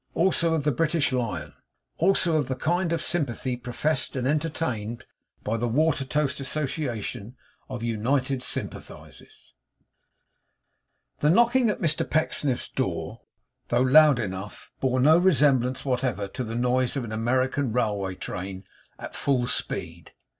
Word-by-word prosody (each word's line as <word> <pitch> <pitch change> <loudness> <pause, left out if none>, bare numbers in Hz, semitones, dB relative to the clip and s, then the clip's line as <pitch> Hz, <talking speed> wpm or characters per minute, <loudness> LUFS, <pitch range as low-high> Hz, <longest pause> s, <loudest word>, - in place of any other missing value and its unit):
ALSO 170 -2 +2
OF 155 - -1
THE 150 - +2
BRITISH 155 +1 +1
LION. 125 -4 -2 0.5
ALSO 175 -2 +3
OF 145 -5 0
THE 130 - -2
KIND 170 +5 0
OF 165 -2 -1
SYMPATHY 130 -6 -2
PROFESSED 130 +5 -2
AND 130 -1 -1
ENTERTAINED 130 -6 -2 0.4
BY 110 +2 -1
THE 120 +2 -1
WATERTOAST 140 +1 +1
ASSOCIATION 130 -6 -3 0.3
OF 125 -3 -5
UNITED 125 +4 0
SYMPATHISERS 125 - -8 1.7
The 150 - +3
knocking 235 +6 +4
at 210 - -2
Mr 160 -3 0
Pecksniff's 145 -4 0
door, - - -3 0.5
though 120 +1 +2
loud 145 +2 +6
enough, 100 -2 -6
bore 130 -1 +1
no 155 +6 +6
resemblance 140 -8 +3
whatever 125 -6 -1
to 130 - -4
the 115 -1 -5
noise 125 +2 +1
of 135 - -2
an 115 - -6
American 130 +3 0
railway 105 -5 -1
train 95 +1 -6 0.3
at - - -8
full 130 -3 +1
speed. 85 -8 -4
130 Hz, 130 wpm, -26 LUFS, 120-155 Hz, 1.7 s, loud